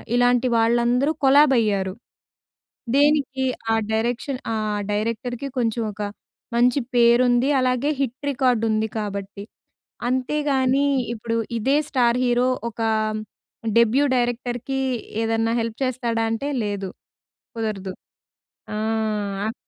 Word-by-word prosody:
ఇలాంటి 245 0 +3
వాళ్ళందరూ 240 +5 +2
కొలాబ్ 275 0 +6
అయ్యారు. 195 -4 0 1.0
దేనికి, 280 -2 +2 0.3
ఆ - - +3 0.2
డైరెక్షన్ 240 +4 -1
ఆ - - -1 0.4
డైరెక్టర్‌కి 230 +5 -2
కొంచెం 230 -1 0
ఒక, 210 - -8 0.6
మంచి 245 +3 +4 0.2
పేరుంది 245 +2 +4
అలాగే, 255 +3 +1
హిట్ 260 0 -2
రికార్డుంది 225 -4 +1
కాబట్టి. 200 -1 -5 0.7
అంతేగాని 265 +1 +1 0.3
ఇప్పుడు 230 0 -3 0.2
ఇదే 270 +6 +2
స్టార్ 245 -2 +2
హీరో, 245 +1 +2 0.2
ఒక 230 - -12 1.0
డెబ్యూ 235 +5 +4
డైరెక్టర్‌కి 245 +2 -2 0.4
ఏదైనా 225 0 +1
హెల్ప్ 225 0 -4
చేస్తాడా 235 -3 -1
అంటే, 275 +6 -2 0.2
లేదు 200 -2 -3 0.7
కుదరదు. 200 -4 -3 0.8
ఆ! - - -3 0.7
అప్ - - -3
240 Hz, 100 wpm, -23 LUFS, 225-260 Hz, 1.0 s, కొలాబ్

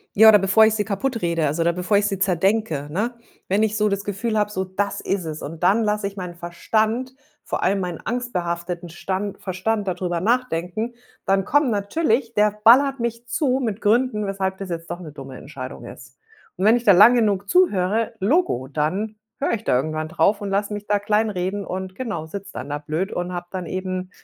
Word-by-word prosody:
Ja, 220 +2 +9
oder 210 -1 +7
bevor 195 +3 +5
ich 220 - +3
sie 210 -1 -1
kaputt 230 +3 -2
rede, 170 -2 0
also, 150 +3 0
oder 170 +1 +2
bevor 180 +3 +1
ich 205 0 +2
sie 200 -2 -2
zerdenke, 190 -4 +1
ne? 215 +9 -1 0.4
Wenn 195 +3 +2
ich 215 0 0
so 210 0 +2
das 200 0 -1
Gefühl 215 +3 -2
habe, 210 -1 +1
so, 190 -2 -1
das 190 +2 -2
ist 195 -3 -2
es 155 -1 -5
und 160 +2 -7
dann 205 +6 +4
lasse 210 -1 0
ich 200 +1 -9
meinen 180 -2 -6
Verstand, 220 +9 -1 0.3
vor - - -3
allem 195 +2 +2
meinen 180 -3 -4
angstbehafteten 175 -7 -3
Stand 190 +4 -4
Verstand 200 +3 -2
dadrüber 180 -1 -1
nachdenken, 220 0 -1 0.3
dann 195 0 +2
kommen 290 +2 +3
natürlich 230 +3 0
der 210 -1 +3
ballert 270 +4 +6
mich 235 0 -3
zu 260 0 +1
mit 220 -3 -2
Gründen, 225 0 +2
weshalb 190 -1 -2
das 195 -1 -7
jetzt 165 -1 -5
doch 175 +1 -4
'ne 165 -4 -9
dumme 135 -2 -9
Entscheidung 135 -2 -8
ist. - - -12 0.4
Und 185 - 0
wenn 220 +2 +6
ich 240 - -1
da 210 - +6
lang 210 +7 +8
genug 205 -4 +1
zuhöre, 220 - +2
logo, 200 - +1
dann 165 +10 -2 0.2
höre 285 - 0
ich 225 -1 -2
da - - +3
irgendwann 155 +3 -2
drauf 200 +5 +2
und 200 - -3
lasse 200 +1 -1
mich 205 0 -6
da 205 - +3
kleinreden 205 -2 0
und 190 0 -5
genau 215 -11 -4
sitze 195 +5 -8
dann - - -6
da 145 +1 -2
blöd 155 +6 -3
und 180 0 -3
habe 175 0 -4
dann 185 -3 -5
eben, 185 0 -4
200 Hz, 210 wpm, -22 LUFS, 175-220 Hz, 0.4 s, Ja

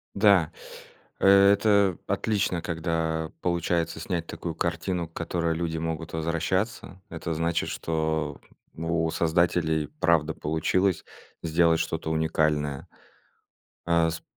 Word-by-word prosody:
Да, 100 -6 +4 0.7
это 100 -1 +5
отлично, 100 -5 0
когда 80 -1 -2
получается 85 -1 0
снять 85 0 -3
такую 85 -2 -5
картину, 85 +1 -2
к 85 - -30
которой 85 -1 -1
люди 80 -1 -2
могут 80 0 -4
возвращаться. 85 +4 -2
Это 85 0 -4
значит, 85 +1 -1
что 80 -2 -2 0.3
у 80 0 -1
создателей 80 -2 +1
правда 80 -3 +2
получилось 80 +4 0 0.4
сделать 80 0 +3
что-то 80 - -2
уникальное. 75 -3 0 1.0
А, 85 -1 +3
с 80 - -6
85 Hz, 105 wpm, -26 LUFS, 80-90 Hz, 1.0 s, это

